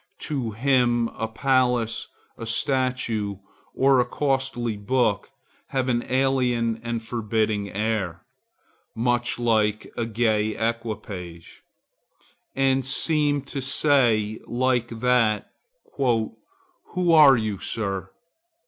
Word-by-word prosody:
To 135 -7 -2
him 120 0 +2
a 110 - -4
palace, 125 -1 +1 0.3
a 115 - -7
statue, 120 -4 0 0.4
or 135 -1 +4
a 125 - +3
costly 135 -5 -1
book 110 -1 0 0.4
have 130 -1 -1
an 120 -1 +1
alien 125 -4 +1
and 115 -1 -3
forbidding 110 -3 -1
air, 100 -5 -2 0.7
much 120 +1 0
like 110 -3 +1
a 115 - -2
gay 110 -1 +1
equipage, 105 -7 -5 0.9
and 135 0 +2
seem 145 +1 +1
to 140 0 -5
say 120 -6 +2
like 125 -1 +1
that, 115 -2 +1 0.5
'Who 115 -5 +1 0.8
are 150 -5 +8
you, 105 -4 -2
Sir? 95 -5 -3
120 Hz, 100 wpm, -24 LUFS, 110-130 Hz, 0.9 s, are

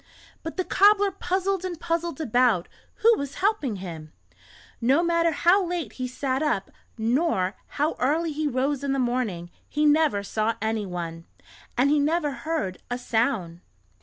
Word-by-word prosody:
But 325 - -6
the 370 - +1
cobbler 405 0 +4
puzzled 380 0 -1
and 355 -3 -4
puzzled 335 -2 -2
about 240 - +2 0.4
who 460 +1 +7
was 280 0 -5
helping 375 - 0
him. 165 -5 -8 0.7
No 270 +8 +3
matter 335 -1 +2
how 350 +6 +4
late 345 - -3
he 255 -1 -4
sat 260 +1 -2
up, 250 -11 0 0.3
nor 225 - +1 0.2
how 300 +3 +1
early 315 +5 +1
he 305 +1 -1
rose 275 +1 0
in 275 -1 0
the - - 0
morning, 240 -9 -1 0.2
he 300 +1 +1
never 295 -9 +3
saw 215 +2 -1
anyone, 180 -7 -3 0.5
and 270 +3 +4
he 300 - +4
never 300 +1 +1
heard 240 - -3
a 245 - -1
sound. 220 -8 -1
280 Hz, 155 wpm, -25 LUFS, 220-335 Hz, 0.7 s, who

